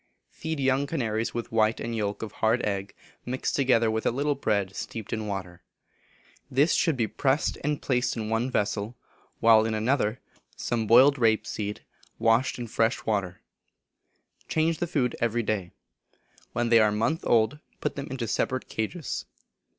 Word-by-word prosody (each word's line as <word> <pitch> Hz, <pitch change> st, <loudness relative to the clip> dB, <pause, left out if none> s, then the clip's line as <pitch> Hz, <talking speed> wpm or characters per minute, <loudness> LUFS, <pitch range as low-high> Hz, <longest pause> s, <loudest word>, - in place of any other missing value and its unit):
Feed 160 Hz, -2 st, -4 dB
young 135 Hz, +1 st, +2 dB
canaries 115 Hz, -8 st, -2 dB
with 120 Hz, -, -4 dB
white 110 Hz, 0 st, +2 dB
and 115 Hz, 0 st, -3 dB
yolk 105 Hz, -1 st, -2 dB
of 110 Hz, -, -5 dB
hard 115 Hz, +2 st, +1 dB
egg, 100 Hz, -1 st, -3 dB, 0.3 s
mixed 130 Hz, +1 st, -2 dB
together 120 Hz, -5 st, +3 dB
with 110 Hz, 0 st, -1 dB
a -, -, +2 dB
little 140 Hz, +4 st, 0 dB
bread 100 Hz, -8 st, -1 dB
steeped 110 Hz, -3 st, -6 dB
in 110 Hz, -1 st, -3 dB
water. 95 Hz, -3 st, -5 dB, 0.9 s
This 140 Hz, +4 st, +3 dB
should 160 Hz, -5 st, +2 dB
be 115 Hz, -, +2 dB
pressed 135 Hz, +5 st, 0 dB
and 150 Hz, 0 st, -1 dB
placed 125 Hz, -2 st, 0 dB
in 110 Hz, -1 st, -3 dB
one 115 Hz, +3 st, 0 dB
vessel, 105 Hz, 0 st, -1 dB, 0.4 s
while 110 Hz, -1 st, +6 dB
in 110 Hz, 0 st, -1 dB
another 110 Hz, 0 st, +1 dB
should -, -, -15 dB
be -, -, -32 dB, 0.3 s
put -, -, -26 dB
some 115 Hz, -2 st, -1 dB
boiled 130 Hz, +5 st, +6 dB
rape 110 Hz, -2 st, +3 dB
seed, 105 Hz, -1 st, -4 dB, 0.4 s
washed 115 Hz, +3 st, +2 dB
in 120 Hz, -, -4 dB
fresh 115 Hz, 0 st, 0 dB
water. 100 Hz, -5 st, -1 dB, 1.1 s
Change 160 Hz, 0 st, +1 dB
the 175 Hz, -, -1 dB
food 130 Hz, -7 st, 0 dB
every 120 Hz, 0 st, +1 dB
day. 100 Hz, -5 st, -2 dB, 0.8 s
When 120 Hz, 0 st, 0 dB
they 115 Hz, -1 st, +7 dB
are 110 Hz, -1 st, +5 dB
a -, -, -2 dB
month 115 Hz, +10 st, 0 dB
old, 115 Hz, +5 st, +2 dB, 0.2 s
put -, -, -2 dB
them 140 Hz, 0 st, -5 dB
into 125 Hz, -3 st, -3 dB
separate 130 Hz, +3 st, -1 dB
cages. 130 Hz, +9 st, -4 dB
115 Hz, 175 wpm, -27 LUFS, 110-130 Hz, 1.1 s, they